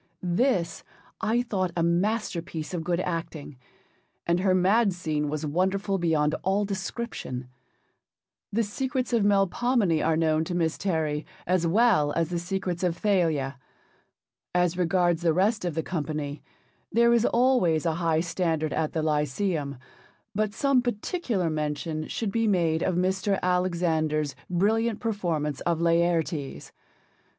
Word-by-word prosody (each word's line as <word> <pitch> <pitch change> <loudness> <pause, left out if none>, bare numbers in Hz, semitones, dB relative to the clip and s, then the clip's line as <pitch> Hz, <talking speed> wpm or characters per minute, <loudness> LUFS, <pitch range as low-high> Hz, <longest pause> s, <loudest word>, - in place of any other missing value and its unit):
This 175 -2 0 0.4
I 225 +2 +1
thought 190 -6 -1
a 170 - +2
masterpiece 170 -3 -1
of 170 -2 -2
good 175 0 0
acting, 165 -5 -5 0.7
and 170 +1 +2
her 185 0 +3
mad 195 +3 +3
scene 155 -4 -2
was 155 +1 -3
wonderful 190 +5 0
beyond 155 -3 +2
all 195 +2 +1
description. 190 - -5 1.0
The 230 +3 +1
secrets 255 +4 -2
of 230 -3 +3
Melpomene 200 -2 +2
are 160 -1 +2
known 160 -1 +2
to 175 - -3
Miss 165 -2 +1
Terry 155 -5 -1 0.2
as 180 -1 +1
well 185 -6 +3
as 165 -1 0
the 175 - -1
secrets 180 0 -3
of 175 -2 0
Thalia. 160 -10 +1 1.0
As 180 -1 +2
regards 175 -1 +2
the 165 -2 +2
rest 205 +3 +1
of 170 -4 -2
the 160 - -1
company 150 -4 -4 0.5
there 235 +1 +4
is 235 -1 +3
always 235 - +3
a 165 - +2
high 165 -1 +2
standard 165 -3 -1
at 155 -1 -1
the 160 - -1
Lyceum, 150 -1 -1 0.6
but 215 0 0
some 275 -3 +3
particular 240 - -1
mention 155 +1 -3
should 220 -4 -3
be 225 +1 +1
made 165 -5 +2
of 185 - 0
Mr. 190 +2 +1
Alexander's 170 -5 0
brilliant 215 +5 +1
performance 170 - -2
of 170 -2 0
Laertes. 165 - 0
175 Hz, 140 wpm, -26 LUFS, 160-200 Hz, 1.0 s, there